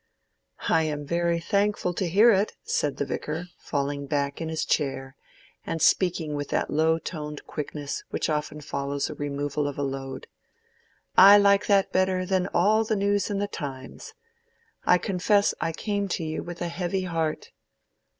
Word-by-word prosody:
"I 160 - +4
am 150 -2 -2
very 170 +2 0
thankful 200 0 0
to 180 0 -2
hear 210 +7 +6
it," 200 0 +1
said 145 -2 -1
the 140 - -1
Vicar, 160 +5 -4
falling 140 -1 -3
back 140 0 -1
in 160 - -3
his 160 -1 -2
chair, 135 -2 -1 0.5
and 165 - -3
speaking 165 -1 +2
with 145 0 -4
that - - -1
low 160 +2 +3
toned 150 -3 -6
quickness 145 -1 -5
which - - -2
often 150 0 -2
follows 140 -1 -3
the - - -4
removal 145 0 -2
of 145 - -5
a 145 - -1
load. 135 -1 -5 0.9
"I 200 +2 +10
like 200 0 +4
that 200 -2 +3
better 185 0 +1
than 185 0 +1
all 215 +5 +3
the 220 0 -1
news 200 0 +1
in 205 - -1
the 205 +1 -1
'Times.' 135 -7 -7 0.7
I 180 - +6
confess 200 +3 +2
I 165 - 0
came 200 +3 -2
to - - -5
you 155 0 -3
with 175 0 -6
a - - -1
heavy 180 +2 -2
heart." 165 -3 -2
165 Hz, 170 wpm, -26 LUFS, 145-190 Hz, 0.9 s, I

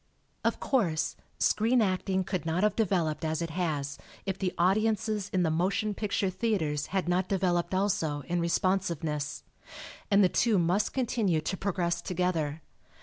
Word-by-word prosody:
Of - - +1
course, 180 - 0 0.2
screen 230 +4 +3
acting 190 -2 +1
could 185 -3 -3
not 165 +4 0
have 210 -1 +3
developed 175 -9 0
as 160 -1 -1
it 165 -1 -3
has 150 -5 -2 0.3
if 195 -2 -1
the 190 -1 -1
audiences 210 +2 +1
in 185 -1 +2
the 160 - +1
motion 190 +6 0
picture 200 -2 -1
theaters 170 -9 -1
had 190 -2 -1
not 180 +1 +1
developed 180 -2 +1
also, 165 -7 0
in 175 +5 -2
responsiveness. 170 -4 -1 0.7
And 200 0 +5
the - - +6
two 220 +3 +2
must 180 +4 +1
continue 230 -9 +1
to 180 - -2
progress 180 -3 -1
together. 165 -4 -1
185 Hz, 150 wpm, -29 LUFS, 165-200 Hz, 0.7 s, the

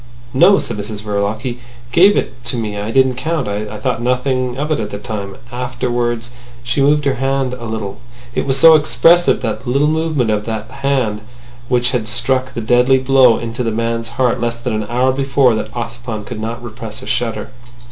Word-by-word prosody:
"No," 195 +9 +6
said - - -2
Mrs 105 0 -5
Verloc. 105 +1 -1
"He 125 -2 -4 0.3
gave 195 +10 +5
it 125 -1 -3
to 125 - -1
me. 110 -3 -3
I 105 +1 -4
didn't 130 +1 +3
count. 155 0 -2
I 105 +1 -4
thought 105 - -2
nothing 125 0 0
of 150 +3 -2
it 155 - +1
at 105 -2 -3
the 100 - -5
time. 100 -2 -6
Afterwards—" 120 -1 -2 0.3
She 125 +3 0
moved 145 +1 +3
her 140 - +3
right 130 - -5
hand 135 -1 0
a 125 -2 -7
little. 110 -3 -5 0.3
It - - -1
was 135 0 +1
so 165 +3 +8
expressive 165 +3 +4
that - - -3
little 140 +4 +2
movement 155 -7 0
of 105 0 -1
that 110 -1 -4
right - - -11
hand 130 -7 0 0.5
which 120 -1 +2
had 120 -4 -1
struck 130 +2 -1
the 115 - -2
deadly 125 +3 +4
blow 130 -2 +5
into 115 +1 -4
a 115 - 0
man's 115 +1 -2
heart 125 -2 +1
less 120 0 -1
than 120 0 -3
an 110 -1 -2
hour 125 +2 +2
before 135 -1 +2
that 110 0 -3
Ossipon 115 -2 -5
could 110 - -6
not 115 +2 -5
repress 115 +1 -8
a - - -8
shudder. 120 -1 -2
120 Hz, 205 wpm, -17 LUFS, 110-135 Hz, 0.5 s, so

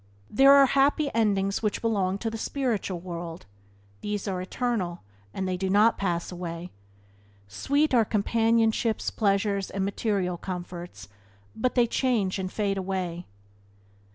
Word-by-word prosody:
These 270 +6 +5
are 280 0 +8
happy 275 +2 +2
endings 200 -3 +1
which 210 -2 -1
belong 200 -4 0
to 225 +2 -3
the 225 - -4
spiritual 225 -9 -2
world; 170 -1 -7 0.6
these 210 0 -3
are 185 -2 -2
eternal, 185 - -2 0.3
and 190 - -3
they 185 -1 -1
do 190 +1 -2
not 210 +4 +4
pass 175 -3 -1
away. 175 0 -6 0.8
Sweet 280 - 0
are 235 -2 +5
companionships, 225 +1 +1
pleasures, 200 -2 0
and 195 0 -2
material 195 -3 -1
comforts, 175 - -7 0.5
but 250 +3 -1
they 245 -2 +5
change 225 -6 0
and 185 -1 -3
fade 200 -2 -1
away. 185 -2 -3
200 Hz, 135 wpm, -26 LUFS, 185-230 Hz, 0.8 s, are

